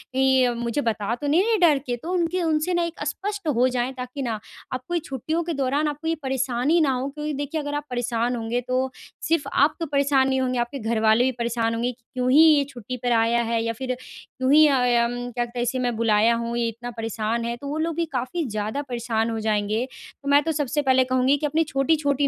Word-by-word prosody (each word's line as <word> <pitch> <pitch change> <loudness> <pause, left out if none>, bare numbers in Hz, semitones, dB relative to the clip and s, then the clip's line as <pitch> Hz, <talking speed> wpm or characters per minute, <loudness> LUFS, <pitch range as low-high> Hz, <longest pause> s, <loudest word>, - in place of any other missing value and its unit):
ये 265 -1 +4
मुझे 235 +3 -2
बता 220 -3 -1
तो 290 - -2
नहीं 310 +5 +4
रहे 450 0 +2
डर 335 -6 +5
के?" 245 -1 -1
तो 335 +9 -6
उनके 360 0 0
उनसे 320 +2 +1
ना 345 0 +2
एक 335 0 -4
अ, - - -3
स्पष्ट 395 +4 -4
हो 245 +2 +4
जाएँ, 250 0 -1
ताकि 255 +2 -5
ना, 230 -4 -2 0.3
आपको 255 +7 -5
ये 345 - +2
छुट्टियों 315 +6 -2
के 335 0 -3
दौरान 280 +2 0
आपको 295 +2 -4
ये 330 - +1
परेशानी 265 +4 +1
ना 290 -3 +3
हो। 255 +2 -2
क्योंकि 300 +1 -4
देखिए, 290 +3 -3
अगर 290 0 -4
आप 290 0 -3
परेशान 245 0 -1
होंगे, 235 +1 -2
तो 255 +1 -1 0.4
सिर्फ 330 -2 +2
आप 285 +3 +3
तो 330 - -1
परेशान 280 -2 +2
नहीं 265 0 +1
होंगे, 255 -1 0
आपके 240 +4 -2
घर 225 -1 -1
वाले 220 +3 +5
भी 260 - +2
परेशान 230 -1 0
होंगे 240 +2 -1
कि 240 -1 -20
क्यों 250 -1 0
ही 295 +4 +7
ये 305 -3 +6
छुट्टी 250 0 -7
पर 245 - +1
आया 230 +1 +3
है, 230 0 0
या 230 0 -1
फिर 255 +2 -3
क्यों 260 0 -4
ही 310 +1 +8
अ, 280 - +3 0.3
अम, 240 +1 -3 0.2
क्या 240 0 -1
कहते 240 +1 -7
हैं - - +1
इसे 250 +2 -1
मैं 245 -2 0
बुलाया 225 0 +3
हूँ? 235 0 -3
ये 235 - +1
इतना 235 +2 -6
परेशान 225 +1 -2
है। 235 - -2
तो 280 - -8
वो 290 +2 -3
लोग 330 - -3
भी 335 - 0
काफ़ी 270 +7 -2
ज़्यादा 215 +5 -3
परेशान 230 -2 -1
हो 225 -1 -2
जाएँगे। 215 +2 0 0.4
तो 280 - -3
मैं 285 +1 +5
तो 325 - 0
सबसे 290 +2 0
पहले 260 -2 +4
कहूँगी 255 +3 +3
कि 300 - -3
अपनी 310 +3 +2
छोटी-छोटी 285 0 +2
255 Hz, 245 wpm, -24 LUFS, 235-290 Hz, 0.4 s, ही